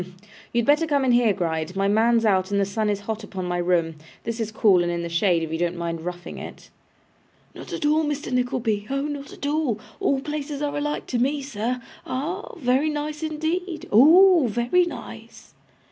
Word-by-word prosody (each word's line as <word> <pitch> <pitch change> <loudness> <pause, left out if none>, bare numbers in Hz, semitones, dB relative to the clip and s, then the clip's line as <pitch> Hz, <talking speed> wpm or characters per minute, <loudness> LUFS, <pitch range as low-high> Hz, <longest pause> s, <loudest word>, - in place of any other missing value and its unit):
You 235 - +2
had - - -3
better 300 +3 +3
come 285 -3 +1
in 255 - +3
here, 240 -2 +4
Gride. 165 -2 -2
My 195 0 +1
man's 225 +2 +3
out, 190 -3 +2
and 200 0 +1
the 200 - +2
sun 210 +2 -1
is 205 -1 -1
hot 220 +1 -4
upon 190 -3 -5
my 175 0 -1
room. 170 -2 +1 0.3
This 230 0 -4
is 220 -1 -2
cool 200 -4 +4
and 175 0 0
in 170 0 -2
the 170 - -4
shade, 170 0 +2
if 160 - -5
you 160 - -2
don't 175 0 0
mind 170 -1 -3
roughing 175 +1 -6
it.' - - -10 0.8
'Not - - -10
at - - -3
all, 305 +2 +3
Mr. 295 -1 -3
Nickleby, 245 -5 0
oh 275 +1 -1
not 285 -1 -5
at - - -7
all! 290 -7 0 0.2
All 275 - +1
places 295 0 -4
are 290 - -2
alike 295 +1 -2
to 245 - -2
me, 280 +3 0
sir. 245 -1 -3 0.2
Ah! 330 - -4
very 270 0 +1
nice 300 0 -4
indeed. 320 +2 -3
Oh! 325 - +7
very 240 - +2
nice! 345 - -10
240 Hz, 205 wpm, -24 LUFS, 195-295 Hz, 0.8 s, Oh